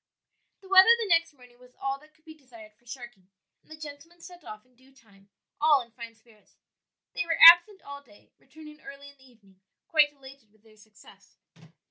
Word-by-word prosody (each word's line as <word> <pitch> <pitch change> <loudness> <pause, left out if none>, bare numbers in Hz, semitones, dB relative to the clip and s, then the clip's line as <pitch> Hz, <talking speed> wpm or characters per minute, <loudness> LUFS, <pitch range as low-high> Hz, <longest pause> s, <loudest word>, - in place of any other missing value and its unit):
The 385 - -18
weather 380 +2 +5
the 455 -3 -6
next 330 -1 0
morning 250 -2 -22
was 250 0 -22
all 270 0 -5
that 305 +1 -25
could 315 - -35
be 315 - -14
desired 235 -8 -18
for 240 +3 -36
sharking, 240 -7 -13 0.3
and - - -36
the 315 - -13
gentlemen 305 +3 -14
set 350 0 -16
off 215 -2 -13
in 255 0 -35
due 260 +2 -26
time, 200 -5 -26 0.3
all 300 -2 +3
in 235 - -24
fine 230 0 -13
spirits. 220 -2 -28 0.6
They - - -4
were 330 -1 -4
absent 350 +4 +6
all 280 0 -12
day, 215 -7 -25
returning 300 +2 -17
early 280 +1 -14
in 280 - -22
the 265 -1 -23
evening 195 -5 -28 0.3
quite 300 -3 +1
elated 270 -5 -18
with 215 0 -34
their 220 -1 -24
success. 210 -2 -22
270 Hz, 200 wpm, -25 LUFS, 230-315 Hz, 0.6 s, absent